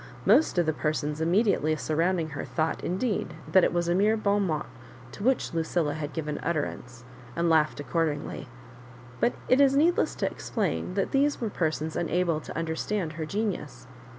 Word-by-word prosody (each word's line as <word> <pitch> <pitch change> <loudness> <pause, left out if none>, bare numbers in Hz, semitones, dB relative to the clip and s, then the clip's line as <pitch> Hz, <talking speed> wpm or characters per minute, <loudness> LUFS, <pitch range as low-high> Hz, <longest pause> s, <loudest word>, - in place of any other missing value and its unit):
Most 230 - +4
of 175 - +3
the 155 - +1
persons 150 0 -2
immediately 170 -3 +2
surrounding 165 +2 0
her 145 - -5
thought, 160 0 -2
indeed, 205 +4 -1 0.2
that 190 -2 +6
it - - +3
was 175 0 0
a 175 - +2
mere 210 +4 +3
borirmot 200 -7 0 0.5
to 200 - -8
which 255 -5 +1
Lucilla 165 -2 0
had 150 -1 -4
given 150 -1 -4
utter 155 -4 0
ance, 125 -1 -8 0.3
and 170 0 +1
laughed 155 -2 +3
accordingly; 145 0 -2 0.7
but 240 - +2
it 255 +2 +5
is 275 -1 +5
need 330 +5 +4
less - - 0
to - - -1
explain 180 - -2
that 195 - 0
these 285 +2 +2
were 225 -3 -2
persons 160 -2 -1
unable 170 -2 0
to - - -8
understand 165 +2 -2
her 155 0 -5
genius. 185 - -3
170 Hz, 175 wpm, -27 LUFS, 155-200 Hz, 0.7 s, that